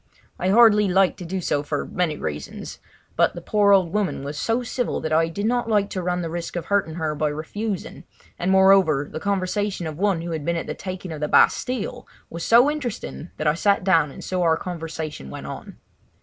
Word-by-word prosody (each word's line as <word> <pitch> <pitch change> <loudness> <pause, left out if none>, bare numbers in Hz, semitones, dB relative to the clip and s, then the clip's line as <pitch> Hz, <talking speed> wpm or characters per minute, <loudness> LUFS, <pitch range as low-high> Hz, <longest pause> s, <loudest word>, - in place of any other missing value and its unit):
I 185 - 0
hardly 210 -1 +6
liked 190 +1 +2
to 180 - -7
do 185 +2 -3
so 145 -4 0
for 145 0 -3
many 170 -5 -1
reasons; 75 -2 -6 0.4
but - - +2
the - - -5
poor 205 -1 +3
old 185 -3 +4
woman 205 -9 -1
was 145 +2 -5
so 230 +10 0
civil 245 0 -2
that 155 0 -3
I 165 +1 +3
did 200 +5 -4
not 240 0 0
like 205 -2 +1
to 185 - -3
run 180 0 -1
the 165 - -3
risk 170 0 -5
of 170 -2 -3
hurting 195 -5 0
her 160 -2 -2
by 150 0 0
refusing, 190 +7 -5 0.3
and 180 - -1
moreover 190 -7 +5
the - - -5
conversation 200 0 -1
of 155 0 -6
one 195 -4 +1
who 170 0 -5
had 160 -2 -3
been 170 +2 -1
at - - -3
the - - -4
taking 185 -2 -6
of 155 - -6
the 150 - -1
Bastille 245 +7 +1 0.2
was 170 0 -5
so 245 +5 +5
interesting 240 - -5
that 155 - -3
I 150 - +4
sat 200 +3 +2
down 185 -6 +3
and - - -10
so 185 -1 -2
our 165 -2 +3
conversation 160 - -6
went - - -8
on. - - -8
180 Hz, 220 wpm, -23 LUFS, 160-205 Hz, 0.4 s, hardly